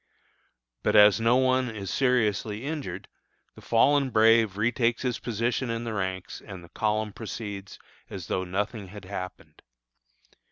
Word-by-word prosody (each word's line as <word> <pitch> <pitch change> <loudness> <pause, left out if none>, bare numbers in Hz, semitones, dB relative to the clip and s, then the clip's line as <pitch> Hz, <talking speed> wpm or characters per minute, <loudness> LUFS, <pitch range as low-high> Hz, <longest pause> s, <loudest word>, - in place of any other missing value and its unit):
But - - +1
as 105 +1 +7
no 115 +2 +4
one 130 -1 +2
is 100 -4 -6
seriously 115 -3 +1
injured, 140 - -5 0.5
the - - -14
"fallen 135 +4 +3
brave" 110 -3 +4
retakes 115 +2 +1
his 125 -2 -1
position 120 +2 -1
in 115 0 -2
the 115 -1 -4
ranks 95 -2 -4
and 95 -4 -9
the 85 - -14
column 110 +1 -1
proceeds 105 -3 -7 0.3
as 95 -4 -7
though 95 - -1
nothing 100 +3 -3
had 100 0 -11
happened. 90 -1 -8
110 Hz, 145 wpm, -27 LUFS, 100-120 Hz, 0.5 s, as